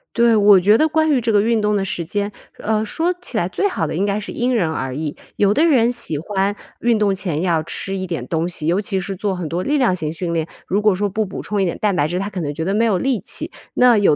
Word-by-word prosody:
对， 235 -1 +4
我 205 -2 +7
觉 210 +5 +5
得 315 - +3
关 315 +1 +1
于 260 -4 +2
这 225 0 0
个 205 -1 +4
运 230 -1 +2
动 210 0 +1
的 195 -1 0
时 175 -2 -3
间， 205 +4 -2 0.3
呃， 215 0 0
说 330 +11 -1
起 240 - -5
来 175 - +1
最 405 - 0
好 - - -1
的 - - -3
应 190 - 0
该 205 +1 0
是 205 - -7
因 245 +1 0
人 170 -7 +1
而 130 -4 -3
异。 150 -1 -3 0.2
有 205 0 +3
的 305 - +3
人 245 -5 +4
喜 235 -11 -2
欢 195 +4 -1 0.2
运 235 -2 +2
动 205 -2 +2
前 180 -5 -2
要 165 -3 +2
吃 195 +4 -4
一 185 -1 -3
点 160 -8 -4
东 165 +1 -1
西， 155 -3 -4
尤 180 +5 +2
其 195 -2 -2
是 190 +1 -4
做 195 0 -2
很 175 -3 -4
多 170 +4 -2
力 290 +6 +1
量 235 -9 +2
型 155 -4 -3
训 170 +1 -3
练， 165 -1 -1 0.2
如 200 +3 +1
果 210 -3 +3
说 205 +2 0
不 215 +3 -1
补 190 - -6
充 205 -2 -1
一 - - +2
点 170 - -2
蛋 205 -3 +1
白 150 -3 +2
质， 175 +3 -2
他 195 +2 -2
可 185 -2 -4
能 145 -2 -2
觉 160 +2 -4
得 195 - 0
没 225 +2 +2
有 205 -5 +2
力 260 -3 0
气。 - - -5 0.2
那 250 -2 +6
有 195 -7 +4
200 Hz, 315 characters per minute, -20 LUFS, 175-220 Hz, 0.3 s, 我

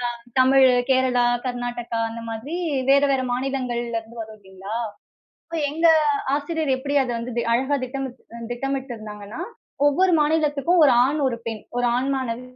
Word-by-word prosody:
அ - - -12 0.2
தமிழ், 265 0 +6 0.2
கேரளா, 255 -2 +3 0.2
கர்நாடகா 245 -1 -3
அந்த 230 0 -7
மாதிரி 270 +10 -5 0.3
வேற, 280 +1 +6
வேற 260 -1 0
மாநிலங்கள்லேருந்து 240 -3 -3
வரும் 220 0 -12
இல்லேங்களா, 190 +2 -8 0.7
இப்ப 330 -1 -4
எங்க 325 +3 +1 0.5
ஆசிரியர் 295 -1 -1
எப்பிடி 285 +2 -3
அத 255 - -3
வந்து 235 +1 -5
தெ 235 - +1
அழகா 265 +4 +1
திட்டமி 270 +1 -4 0.3
அ 235 - -8
திட்டமிட்டிருந்தாங்கன்னா, 240 -4 -5 0.5
ஒவ்வொரு 360 +5 +3
மாநிலத்துக்கும் 305 +2 +2
ஒரு 275 - +6
ஆண், 295 +3 -1
ஒரு 235 - -3
பெண், 220 -2 -4
ஒரு 245 0 +1
ஆண் 260 +2 0
மாணது 250 -2 -3
255 Hz, 150 wpm, -23 LUFS, 235-280 Hz, 0.7 s, தமிழ்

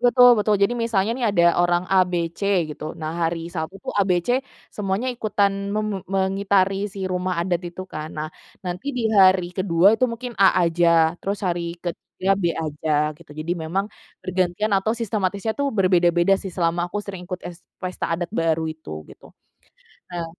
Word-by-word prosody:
Betul 245 0 +7
betul 210 0 +2
jadi 200 - +4
misalnya 230 -3 0
nih 245 -1 -1
ada 180 -4 +2 0.2
orang 175 0 +2
A, 190 - +6
B, 180 - -4 0.2
C - - -18 0.3
gitu 155 +2 -7
nah 155 -1 -4 0.2
hari 170 0 -5
Sabtu 160 +2 -4
tuh - - -3
A, 205 - +1
B, 180 - +4
C 245 +2 +2 0.3
semuanya 210 +5 -1
ikutan 205 -4 +1 0.2
me 210 +1 -1
me 215 - -2 0.2
mengitari 195 +1 +1
si 195 -1 -6
rumah 185 -1 -1
adat 170 0 0
itu 185 +2 -8
kan, 155 0 -5
nah 155 0 -3 0.4
nanti 180 +5 -5
di 245 - -1 0.2
hari 185 -2 +5
ke-2 185 +1 +4
itu 255 - +2
mungkin 245 +1 -6
A 195 - +8 0.2
aja, 170 +1 +2 0.3
terus 200 +1 -2
hari 170 -1 -2
ke-3 185 +2 -2
B - - -2 0.2
aja, 155 0 -4 0.3
gitu 170 -3 -18
jadi 165 +3 -2
memang 185 +5 -1 0.4
bergantian 185 +3 0
atau 200 +3 +2
sistematisnya 205 -1 -1
tuh 280 - +2
berbeda-beda 175 -1 +3
sih 195 - -5
selama 170 0 +1
aku 175 - -6
sering 190 -3 -7
ikut 185 -1 -4
es 175 0 -11 0.2
pesta 185 0 -4
adat 175 0 -4
baru 165 -1 +1
itu 155 0 -13 0.2
gitu. - - -16 0.9
Nah 175 -1 -4
185 Hz, 185 wpm, -23 LUFS, 170-200 Hz, 0.9 s, A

